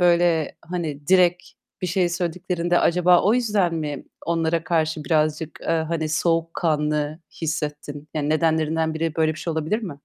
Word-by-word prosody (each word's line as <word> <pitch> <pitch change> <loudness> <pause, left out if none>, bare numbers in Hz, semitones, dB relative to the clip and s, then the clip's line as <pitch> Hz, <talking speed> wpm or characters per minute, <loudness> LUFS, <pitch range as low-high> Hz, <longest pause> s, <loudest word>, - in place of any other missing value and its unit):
böyle, 170 -3 +3
hani, 160 -5 -4
direkt 180 -1 +4 0.4
bir 185 - 0
şey 180 0 +1
söylediklerinde 175 0 -1
acaba 180 +1 +4
o 210 +4 +4
yüzden 205 -8 +1
mi 150 -3 -4 0.2
onlara 165 0 0
karşı 160 -2 0
birazcık, 155 -1 0
eee, - - -7
hani, 160 -1 0
soğukkanlı 155 -2 0 0.2
hissettin? 150 -2 -4
Yani 150 -1 -1
nedenlerinden 160 0 +1
biri 160 0 -2
böyle 160 -1 +2
bir - - -10
şey 165 - -3
olabilir 160 +7 -1
mi? 195 - -4
165 Hz, 150 wpm, -23 LUFS, 155-175 Hz, 0.4 s, direkt